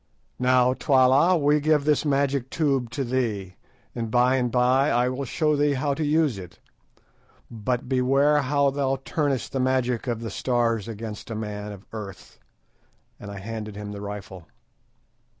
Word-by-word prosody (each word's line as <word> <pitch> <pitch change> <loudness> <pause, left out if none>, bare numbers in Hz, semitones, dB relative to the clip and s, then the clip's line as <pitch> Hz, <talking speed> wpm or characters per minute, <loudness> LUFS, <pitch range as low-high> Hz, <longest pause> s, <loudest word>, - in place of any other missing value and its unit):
"Now, 125 0 +3
Twala, 135 +7 +4
we 150 0 +3
give 150 -1 +2
this 150 0 +2
magic 140 -2 0
tube 135 -6 0
to 130 +4 -3
thee, 110 -7 -2 0.4
and 115 -2 -4
by 125 +3 +3
and 125 -2 0
by 130 +3 +3
I 120 +1 +2
will 130 +2 -4
show 150 +3 +1
thee 145 0 +2
how 140 +2 0
to 155 - -3
use 150 -7 +1
it; 90 -2 -11 0.9
but 120 +3 -3
beware 135 +3 +3
how 140 +1 +2
thou 135 -1 0
turnest 145 -5 -1
the 135 - -2
magic 130 -2 0
of 115 -2 -2
the 115 - -5
Stars 115 -4 0
against 110 -1 -7
a 110 - -4
man 105 -1 -5
of 100 0 -11
earth," 100 -4 -9 0.8
and 100 - -9
I 100 - -7
handed 110 +1 -6
him 105 0 -6
the 100 -1 -7
rifle. 100 -4 -8
125 Hz, 165 wpm, -25 LUFS, 110-140 Hz, 0.9 s, Twala